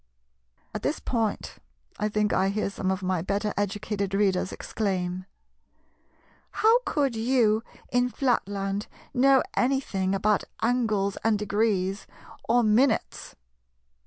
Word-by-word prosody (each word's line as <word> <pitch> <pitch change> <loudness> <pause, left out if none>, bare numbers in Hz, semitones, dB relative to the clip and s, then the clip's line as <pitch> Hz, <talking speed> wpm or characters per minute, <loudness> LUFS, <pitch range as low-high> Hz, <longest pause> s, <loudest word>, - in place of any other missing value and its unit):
At - - -4
this - - -1
point 225 -4 -2 0.4
I 210 - 0
think 210 0 0
I 190 +1 +2
hear 200 0 -1
some 190 -1 -2
of 190 0 -1
my 185 -2 0
better 200 +3 -1
educated 200 -1 -2
readers 190 -2 +1
exclaim, 185 -3 -3 1.3
"How 450 +3 +4
could 275 -5 +1
you 225 -2 +2 0.3
in 245 0 +2
Flatland 205 -6 -1 0.3
know 270 +1 +5
anything 210 -8 0
about 210 +2 +2 0.2
angles 220 -5 +1
and 225 -1 +3
degrees, 205 -2 0 0.4
or 240 +1 +4
minutes? 225 +3 +1
210 Hz, 115 wpm, -26 LUFS, 195-235 Hz, 1.3 s, know